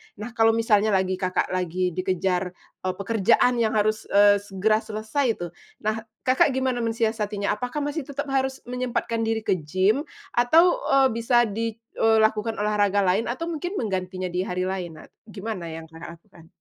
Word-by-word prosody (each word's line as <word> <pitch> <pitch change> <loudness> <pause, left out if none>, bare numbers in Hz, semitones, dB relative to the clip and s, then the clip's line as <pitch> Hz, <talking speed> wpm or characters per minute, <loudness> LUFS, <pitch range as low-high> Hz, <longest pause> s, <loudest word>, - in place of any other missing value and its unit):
Nah, 215 +4 -7
kalau 225 0 +3
misalnya 215 -2 +3
lagi 185 0 0
Kakak 185 0 -1
lagi 180 0 -1
dikejar, 185 0 -1 0.3
eee, 185 - 0
pekerjaan 230 +4 +2
yang 220 -1 +1
harus, 215 +1 0
eee, 205 0 +5
segera 205 +2 0
selesai 220 +5 -2
tu, 175 -1 -6 0.3
nah 215 +1 0 0.2
Kakak 260 +1 +3
gimana 260 -2 0
mensiasatinya? 220 -3 -1
Apakah 250 +7 -3
masih 290 0 -3
tetap 285 0 -5
harus 265 0 -1
menyempatkan 240 -2 -2
diri 225 -1 -1
ke 185 - +1
gym 190 - +1 0.2
atau, 330 - +4
eee, 270 -1 +5
bisa 230 +1 +3
di 225 0 -3 0.2
eee, 225 0 +4
lakukan 220 +1 +1
olahraga 205 -1 +1
lain 190 +5 +1
atau 250 +7 -3
mungkin 350 +5 -4
menggantinya 185 - -3
di 180 - -2
hari 180 0 -2
lain? 185 -3 -4
Nah - - -15 0.2
gimana 210 -4 -6
yang 165 0 -7
Kakak 165 +1 -9
lakukan? 170 -2 -20
215 Hz, 165 wpm, -24 LUFS, 185-240 Hz, 0.3 s, eee